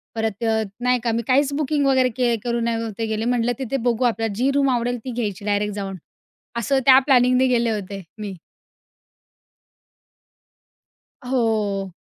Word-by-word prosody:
परत 220 -1 -2
अ, 220 -1 +1 0.2
नाही 250 0 +2
का 235 - +1
मी 230 +1 0
काहीच 275 +2 +2
बुकिंग 290 0 0
वगैरे 260 -2 +3
के 245 -2 +2
करून 235 -1 -1
नव्हते 230 -1 -2
गेले, 220 0 -2
म्हटलं 240 0 +1
तिथे 265 0 -2
बघू 240 +1 +1
आपल्याला 225 -2 0
जी 255 +6 +1
रूम 280 -1 +3
आवडेल 245 -1 0
ती 255 - -4
घ्यायची 210 -5 -4
डायरेक्ट 205 0 0
जाऊन. 195 -2 -5 0.6
असं 265 +4 +1
त्या 265 -1 +8
प्लॅनिंगने 255 -1 +4
गेले 235 -2 +2
होते 200 -2 -5 0.2
मी. 205 -2 -5 2.9
हो. 215 -6 -1
235 Hz, 150 wpm, -22 LUFS, 220-255 Hz, 2.9 s, त्या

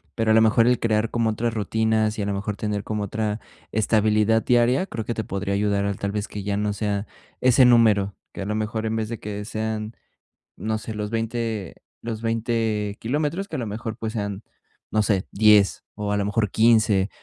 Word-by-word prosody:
pero 110 -1 +1
a - - +6
lo 110 - +6
mejor 115 +1 +4
el 125 -1 +3
crear 110 -1 +1
como 115 -2 +1
otras 115 +2 -1
rutinas, 110 0 0
y 105 - -2
a - - -2
lo 100 - -1
mejor 105 +1 -3
tener 105 -1 -3
como 105 -1 -3
otra 105 +1 -2 0.3
estabilidad 110 0 +2
diaria, 125 +7 +3
creo 115 -2 -5
que 120 - -2
te 110 - -3
podría 100 +1 -3
ayudar 100 0 +1
a, 100 - 0
tal 100 +1 -3
vez, 105 0 -3
que 105 - -6
ya 100 0 -1
no 105 0 0
sea 100 -1 -2 0.4
ese 130 0 +6
número. 110 -5 +4 0.2
Que - - -6
a 95 - -3
lo 105 - -2
mejor 110 +1 -2
en 110 - -1
vez 110 0 -2
de 115 - -5
que 105 0 -5
sean, 110 0 -3 0.6
no 110 0 -2
sé, 110 +1 -6
los 105 -1 -4
20 115 -4 -3 0.3
los 115 -1 -5
20 115 -2 -1
kilómetros, 150 - -1
que 160 - -6
a 135 - -2
lo 120 - -3
mejor, 110 +1 -5
pues 110 -1 -4
sean 100 -1 -4 0.5
no 110 - +2
sé, 100 -3 0
10, 105 -1 +4
o 105 -1 -3
a - - +1
lo 100 - 0
mejor 105 -1 0
15 110 -3 +4
110 Hz, 215 wpm, -24 LUFS, 105-115 Hz, 0.6 s, a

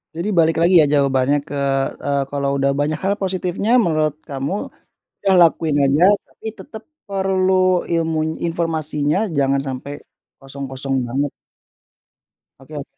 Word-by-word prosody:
Jadi 170 +4 -3
balik 165 -2 +3
lagi 170 +2 +4
ya - - +4
jawabannya 140 0 +2
ke 145 - -6 0.5
eee, 140 -1 +1
kalau 140 -1 -1
udah 140 0 +2
banyak 150 +1 0
hal 195 +1 +2
positifnya 185 +2 -2
menurut 155 - +1
kamu, 140 +4 -3 0.7
ya 195 - +3
lakuin 160 -2 +2
aja, 140 +4 +2 0.2
tapi - - -15
tetap 220 -1 -10 0.3
perlu 190 -1 +1 0.4
ilmuny 160 -1 -1
informasinya, 155 -3 -1 0.2
jangan 135 0 +2
sampai 130 +2 -6 0.5
kosong-kosong 135 0 -5
banget. 135 +4 -2 1.3
Oke 140 +3 -13
o 145 - -4
150 Hz, 130 wpm, -20 LUFS, 140-170 Hz, 1.3 s, lagi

